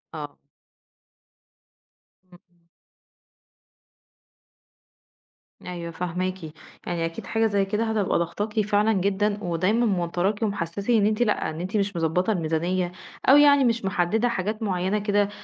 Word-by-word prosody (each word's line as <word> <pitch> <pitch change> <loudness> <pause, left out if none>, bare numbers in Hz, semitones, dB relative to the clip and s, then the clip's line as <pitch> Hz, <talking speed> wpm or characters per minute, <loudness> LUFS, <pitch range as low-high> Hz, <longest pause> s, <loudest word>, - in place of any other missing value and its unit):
آه. 145 -2 -7 1.9
امم. 175 -1 -22 3.0
أيوه 170 -2 -6
فاهماكِ، 180 +2 -3 0.4
يعني 170 -2 -1
أكيد 165 0 -6
حاجة 225 0 +1
زي 200 -2 +1
كده 210 +3 -1
هتبقى 220 -3 0
ضاغطاكِ 205 +6 -2
فعلًا 210 +1 +2
جدًا 200 +2 0
ودايمًا 185 +7 +1
موتراكِ 185 +2 0
ومحسّسِك 200 -1 -3
إن 220 -4 +4
أنتِ 215 +2 0
لأ، 215 -4 +1
إن 160 +1 -6
أنتِ 190 +4 -2
مش 200 -2 -1
مُضبطة 170 +5 +1
الميزانية 175 +1 -1 0.4
أو 275 - +9
يعني 285 -1 +6
مش 230 -4 +1
محددة 205 +5 +1
حاجات 215 +1 -3
مُعيّنة 190 +1 0
كده 205 0 +1
195 Hz, 120 wpm, -25 LUFS, 175-215 Hz, 3.0 s, أو